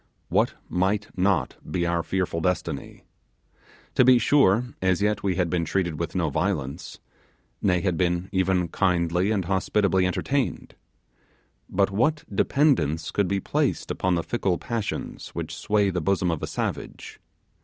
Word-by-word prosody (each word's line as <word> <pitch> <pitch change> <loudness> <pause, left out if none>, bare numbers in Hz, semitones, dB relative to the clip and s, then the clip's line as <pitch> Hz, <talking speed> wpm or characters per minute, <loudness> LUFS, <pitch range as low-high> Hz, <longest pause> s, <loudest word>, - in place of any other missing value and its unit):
What - - +2
might 95 +3 -1
not 90 -6 +1
be 90 -2 0
our 85 0 +1
fearful 90 -2 -2
destiny? 90 +2 -3 0.9
To - - +5
be 125 0 +7
sure, 120 -3 +4 0.2
as 95 -1 +2
yet 105 0 +1
we 95 -2 0
had 90 0 +1
been 85 0 0
treated 85 -2 -1
with 85 +1 -3
no 85 -5 0
violence; 80 -3 -2 0.6
nay, 90 -3 +2
had 90 -3 0
been 90 0 0
even 95 -2 +1
kindly 90 0 +1
and 100 -5 0
hospitably 95 0 +1
entertained. 135 +8 -2 1.0
But 100 +1 +1
what 150 +10 +1
dependence 95 - +2
could 100 -2 +1
be 100 +2 0
placed - - -1
upon 90 -1 0
the 85 - -1
fickle 95 -7 0
passions 115 -3 -4
which - - -4
sway 105 -2 +1
the 90 -1 -2
bosom 90 0 +1
of 80 - -3
a - - -3
savage? - - -5
95 Hz, 150 wpm, -25 LUFS, 85-100 Hz, 1.0 s, be